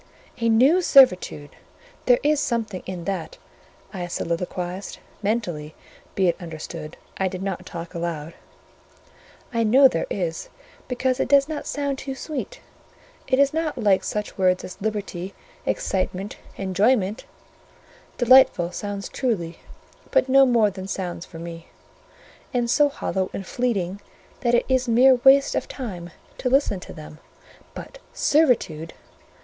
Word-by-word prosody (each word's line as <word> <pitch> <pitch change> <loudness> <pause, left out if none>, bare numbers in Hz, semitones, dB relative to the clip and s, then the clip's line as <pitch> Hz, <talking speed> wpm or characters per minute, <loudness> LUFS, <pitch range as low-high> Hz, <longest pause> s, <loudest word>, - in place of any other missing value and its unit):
"A 230 0 +1
new 265 +11 +5
servitude! 185 - +4 0.6
There - - +6
is 300 0 +3
something 225 -8 -2
in 180 -2 -5
that," 195 - -4 0.6
I 180 -3 -4
soliloquised 180 +2 -4 0.2
(mentally, 180 -9 -2 0.4
be 190 -2 +2
it 170 - +2
understood; 160 -1 -7 0.2
I 190 - +1
did 185 0 -5
not 195 -2 -4
talk 170 0 -7
aloud), 170 -2 -4 1.2
"I 230 - +1
know 260 +5 +7
there 165 - -2
is, 170 -4 -3 0.4
because 255 0 -1
it - - +1
does 280 +1 +5
not 310 -2 -5
sound 280 -1 -2
too 270 -1 -5
sweet; 310 - -6 0.7
it 260 - +2
is 280 +1 +4
not 320 -2 -2
like 205 -5 +3
such 210 -1 -4
words 185 -1 +2
as 185 - -9
Liberty, 200 -3 -4 0.3
Excitement, 190 +1 -2 0.2
Enjoyment: 200 +3 +1 0.9
delightful 245 -8 +5
sounds 200 +1 -5
truly; 195 -11 -2 0.5
but - - +3
no 270 +1 +6
more 230 -4 +3
than 190 0 -8
sounds 180 -3 -4
for 165 - -11
me; 165 0 -8 0.9
and 240 -1 +1
so 295 +2 +4
hollow 190 -8 -2
and 195 - -5
fleeting 200 -5 -2 0.4
that 240 -1 +2
it - - +2
is 260 -1 +1
mere 250 +2 +5
waste 275 +1 +6
of - - -2
time 185 -10 -6 0.3
to 250 - 0
listen 265 -7 +2
to - - -11
them. 155 -1 -11 0.6
But - - -9
Servitude! 230 - +1
205 Hz, 140 wpm, -23 LUFS, 180-260 Hz, 1.2 s, know